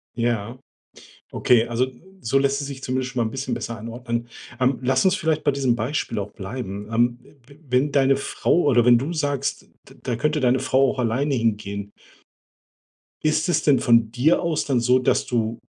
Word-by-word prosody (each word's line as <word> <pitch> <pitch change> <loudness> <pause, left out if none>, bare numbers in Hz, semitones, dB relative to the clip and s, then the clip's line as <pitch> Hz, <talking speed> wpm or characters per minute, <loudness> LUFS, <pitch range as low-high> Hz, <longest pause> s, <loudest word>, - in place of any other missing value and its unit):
Ja. 115 -1 -2 0.7
Okay, 120 -1 +3
also, 120 +2 0 0.3
so 135 -3 0
lässt 140 +1 +1
es 140 - -4
sich 135 -1 -8
zumindest 130 0 -2
schon 120 -2 0
mal - - -1
'n 110 - -7
bisschen 135 +1 -4
besser 115 - -4
einordnen. 115 +1 -5 0.3
Ähm, 130 +1 +1
lass 130 +4 +1
uns 190 0 +4
vielleicht 155 -5 -1
bei 145 - +3
diesem 135 -3 +1
Beispiel 115 -1 -2
auch 100 +1 -5
bleiben, 100 -1 -6
ähm. 120 +1 +2 0.3
W 140 0 -17
wenn 130 +4 +2
deine 135 -1 +3
Frau 165 +4 0
oder 120 -5 +3
wenn 120 -1 +7
du 140 +8 -3
sagst: 145 -3 -2 0.3
„D - - -16
da 120 - -2
könnte 150 +5 0
deine 130 -1 +2
Frau 130 0 +2
auch 130 - -8
alleine 130 +5 0
hingehen" 105 -3 -2 1.3
ist 155 +3 +1
es - - +1
denn 140 -3 +4
von 115 -2 +3
dir 130 +8 +2
aus 170 -3 -1
dann 135 -4 +1
so, 125 +2 +3
dass 125 - +1
du 115 -2 -2
125 Hz, 190 wpm, -23 LUFS, 115-140 Hz, 1.3 s, wenn